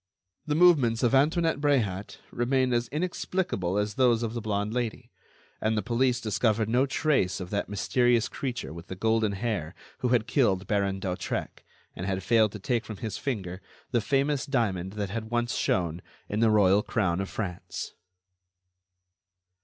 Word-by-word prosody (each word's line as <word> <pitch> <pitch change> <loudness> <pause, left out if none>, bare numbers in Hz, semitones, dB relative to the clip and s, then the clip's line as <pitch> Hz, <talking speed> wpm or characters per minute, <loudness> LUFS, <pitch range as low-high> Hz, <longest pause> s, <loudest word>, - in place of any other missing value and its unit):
The 150 - +1
movements 145 -9 +4
of 120 - +3
Antoinette 160 +3 +2
Bréhat 110 -10 0
remained 130 +1 +1
as 120 0 +1
inexplicable 150 - -2
as 105 0 0
those 120 -1 +3
of 115 -1 -2
the 120 - -3
blonde 105 0 -2
Lady, 120 -3 -3 0.5
and 110 0 +1
the 105 - 0
police 125 +1 +1
discovered 110 -1 +1
no 125 +4 +2
trace 135 - +1
of 90 -1 -7
that 100 -1 -2
mysterious 120 +3 +2
creature 125 - -4
with 85 +1 -10
the 95 - -6
golden 110 +1 +1
hair 100 -5 -3 0.2
who 125 - 0
had 120 -3 +2
killed 105 -7 +2
Baron 100 -2 0
d'Hautrec 90 -1 -4 0.3
and 90 - -5
had 95 -1 -2
failed 110 0 +4
to 105 - -6
take 115 +3 0
from 110 - -8
his 110 +2 -5
finger 95 -8 -4 0.3
the 120 -2 +2
famous 140 +6 0
diamond 100 -9 -1
that 100 -3 -3
had 110 0 -4
once 120 0 0
shone 85 -2 0 0.3
in 105 - -2
the 115 0 +4
royal 100 -2 +5
crown 95 -5 0
of 95 - -4
France. 90 -5 -5
110 Hz, 165 wpm, -27 LUFS, 100-125 Hz, 0.5 s, royal